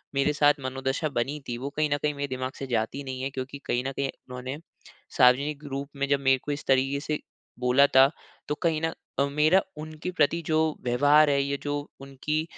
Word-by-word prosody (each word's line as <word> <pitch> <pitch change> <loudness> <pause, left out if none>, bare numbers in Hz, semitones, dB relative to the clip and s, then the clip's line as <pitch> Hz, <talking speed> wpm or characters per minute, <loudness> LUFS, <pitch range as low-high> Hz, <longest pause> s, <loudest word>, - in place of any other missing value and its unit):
मेरे 140 +2 +2
साथ 145 0 +5
मनोदशा 135 +3 -2
बनी 135 +5 -1
थी 120 - -3
वो 135 +3 -4
कहीं 155 -1 +2
न - - +1
कहीं 150 0 0
मेरे 140 0 -3
दिमाग 130 -1 -3
से 135 - -5
जाती 120 +3 -1
नहीं 130 -1 -5
है। 135 - -1
क्योंकि 135 +1 -6
कहीं 120 +1 0
न - - -2
कहीं 140 0 -2
उन्होंने, 125 +2 -7 0.6
सार्वजनिक 140 +4 +4
रूप 140 +1 -4
में 140 0 -1
जब 140 -1 +3
मेरे 135 -1 +3
को 145 - -3
इस 145 0 -4
तरीके 135 +1 +2
से 150 +1 -3 0.4
बोला 125 +3 +5
था। 135 -1 +6 0.4
तो 150 - -1
कही 160 -2 +2
न 165 - -2 0.4
मेरा 155 +6 +4 0.2
उनके 155 +3 -6
प्रति 170 0 +2
जो 155 0 +2 0.2
व्यवहार 145 +5 +5
है 140 -1 +3
या 140 0 -2
जो 145 0 -1 0.3
उनकी 140 +3 -2
140 Hz, 205 wpm, -27 LUFS, 130-150 Hz, 0.6 s, था